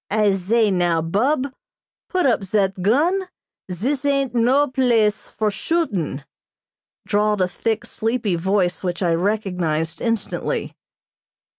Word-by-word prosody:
"I 210 -1 +3
zay, 205 +3 +2
now, 175 -3 +2
Bub, 255 - 0 0.6
put 365 -1 +1
up 240 -6 +2
zat 195 -1 0
gun. 325 - +2 0.4
Zis 255 - -1
ain't 275 -3 +1
no 250 +5 +3
place 235 -6 +1
for 215 -1 -1
shootin'," 195 - -2 0.8
drawled 210 0 +1
a 185 - +2
thick, 225 +5 -2
sleepy 225 -4 -1
voice 180 +1 0
which 180 0 -2
I 170 -2 +2
recognized 170 -4 -1
instantly. 230 -2 -2
210 Hz, 120 wpm, -21 LUFS, 180-250 Hz, 0.8 s, I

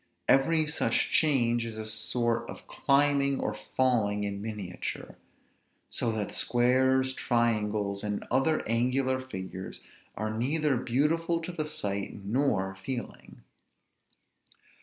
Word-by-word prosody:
Every 155 +4 +4
such 150 +1 +1
change 120 -6 +3
is 115 -1 -5
a 110 - -4
sort 115 +2 0
of - - -9
climbing 140 -1 +2
or - - -1
falling 110 -6 0
in 100 -1 -3
miniature; 105 -4 -5 0.7
so 115 - 0
that 105 -2 -3
squares, 130 +3 +2
triangles, 105 -5 0
and 105 -1 -3
other 135 +5 +2
angular 130 +3 +1
figures 95 -6 -7 0.4
are 110 +1 -2
neither 145 +5 +1
beautiful 165 +8 +1
to 170 +2 -5
the 155 -3 -3
sight 100 -7 -2
nor 100 -5 0
feeling. 120 +6 -7
120 Hz, 115 wpm, -29 LUFS, 105-135 Hz, 0.7 s, Every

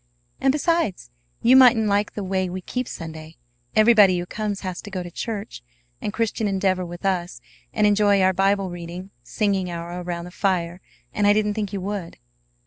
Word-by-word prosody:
"And, 270 - +3
besides, 285 - 0 0.3
you 245 +3 +6
mightn't 250 -4 +7
like 205 0 +1
the 205 - -4
way 185 -1 -1
we 185 +1 -5
keep 250 +7 -4
Sunday. 160 -1 -8 0.4
Everybody 215 -4 +6
who 175 - -3
comes 210 +1 -4
has 185 -2 -5
to 205 - -9
go 185 -2 -4
to 175 - -9
church 210 - -5 0.4
and - - -2
Christian 225 0 -1
Endeavor 190 -2 0
with 175 +1 -8
us, 180 -2 -1 0.3
and 215 - +1
enjoy 205 -1 +4
our 190 0 +3
Bible 195 0 +1
reading, 175 +2 -8
singing 195 - -1
hour 170 +1 -5
around 175 -1 -5
the 180 - -10
fire; 180 -2 -1 0.3
and 205 -2 +2
I 205 - +6
didn't 210 0 +1
think 205 -2 -3
you 200 - -4
would." 195 -2 -5
195 Hz, 185 wpm, -23 LUFS, 180-210 Hz, 0.4 s, mightn't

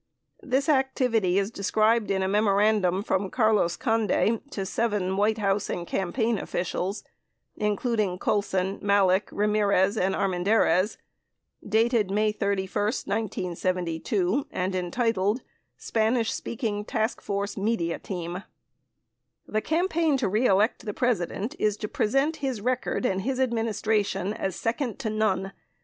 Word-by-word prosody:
This 275 -3 0
activity 250 - +2
is 200 +2 0
described 215 +2 +1
in 190 -1 +1
a - - 0
memorandum 200 -2 +2
from 190 -2 0
Carlos 215 -7 +2
Conde 225 0 +1
to 195 -8 -4
seven 200 -3 -1
White 210 +2 +2
House 200 -1 0
and 175 - -3
campaign 215 +5 -1
officials, 185 +3 -3 0.5
including 210 -2 0
Colson, 195 -1 0
Malek, 200 -1 +3
Ramirez, 205 -1 +2
and 190 0 +1
Armendariz, 195 +1 +2 0.7
dated 220 -1 +2
May 210 +2 +2
31, 200 -2 -2
1972, 185 - -1
and 185 +1 -2
entitled, 205 +4 0 0.3
"Spanish 225 +1 0
Speaking 215 -3 -3
Task 220 0 -2
Force 200 0 -3
Media 195 -5 -1
Team": 175 -1 -5 1.0
The 215 - -1
campaign 325 - +1
to 255 - 0
re 215 +6 +2
elect 200 +4 +2
the 210 -2 -5
President 230 - -1
is 210 -1 +1
to 210 - -4
present 275 +10 +1
his 265 -5 -2
record 255 +3 -1
and 190 -5 0
his 260 +5 -2
Administration 215 -5 0
as 190 -4 -3
second 235 +3 -2
to 235 -5 -3
none. 195 -3 0
210 Hz, 125 wpm, -26 LUFS, 190-230 Hz, 1.0 s, Malek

